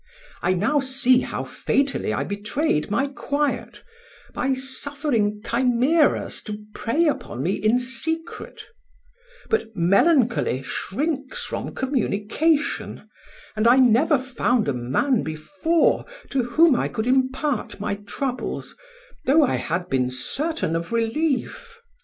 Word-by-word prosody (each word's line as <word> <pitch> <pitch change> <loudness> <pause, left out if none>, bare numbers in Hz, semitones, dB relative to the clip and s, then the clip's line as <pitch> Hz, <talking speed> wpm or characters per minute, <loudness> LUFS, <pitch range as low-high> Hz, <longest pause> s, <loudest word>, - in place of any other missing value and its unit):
I 185 +1 +2
now 225 +12 +2
see 260 -1 +3
how - - -4
fatally 275 - -1
I 105 - -1
betrayed 205 - -1
my 240 +7 +1
quiet, 285 +1 -2 0.5
by 265 +1 0
suffering 260 -5 -1
chimeras 255 +6 +2
to 210 -1 -5 0.2
prey 310 +9 0
upon 135 - -2
me 175 - +1
in 215 +4 +2
secret; 320 +7 -4 0.8
but 450 - 0
melancholy 205 - +3
shrinks 280 - -3
from - - -5
communication, 265 +4 0 0.5
and 215 +1 +2
I 240 - +7
never 260 +4 +4
found 250 -2 0
a 140 - +1
man 135 - +1
before 290 - 0 0.3
to 260 -3 +1
whom 315 +4 +4
I - - 0
could 220 -2 -3
impart 260 -1 0
my 205 0 -2
troubles, 245 +6 -4 0.5
though 300 +4 +6
I 265 - +1
had 175 +3 -2
been 125 -4 +1
certain 265 - -1
of 170 +4 -3
relief. 300 - -1
255 Hz, 120 wpm, -23 LUFS, 210-290 Hz, 0.8 s, I